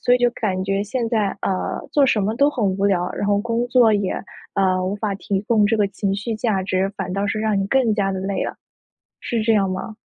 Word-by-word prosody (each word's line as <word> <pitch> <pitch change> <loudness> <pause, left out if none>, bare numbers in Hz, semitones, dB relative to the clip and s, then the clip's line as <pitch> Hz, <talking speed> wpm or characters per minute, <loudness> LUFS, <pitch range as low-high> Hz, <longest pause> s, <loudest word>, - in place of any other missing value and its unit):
所 245 - +4
以 - - +2
就 245 0 +3
感 190 -5 -2
觉， 195 +1 0
现 235 +2 -2
在， 210 -4 0
呃， 185 -1 -1
做 285 -2 +4
什 215 -4 +2
么 215 +3 0
都 280 +2 +4
很 240 -7 -2
无 195 +1 0
聊。 180 -3 +1
然 205 - -3
后 200 0 +3
工 235 +2 -1
作 240 -4 +5
也， 200 -2 0 0.4
呃， 185 -1 +2
无 190 - -1
法 205 -1 -2
提 195 -1 -2
供 215 -1 +3
这 225 +1 +1
个 205 -1 +2
情 195 0 -2
绪 215 +3 -3
价 215 -4 0
值， 185 +1 0
反 185 -2 -4
倒 200 +1 -1
是 215 +1 -1
让 215 -2 +1
你 195 - -1
更 250 -2 +2
加 195 -2 0
地 190 - -3
累 195 +1 -2
了。 - - -5 0.6
是 230 -2 -2
这 225 +1 +3
样 195 -2 +2
吗？ 185 +4 -5
205 Hz, 270 characters per minute, -21 LUFS, 195-225 Hz, 0.6 s, 作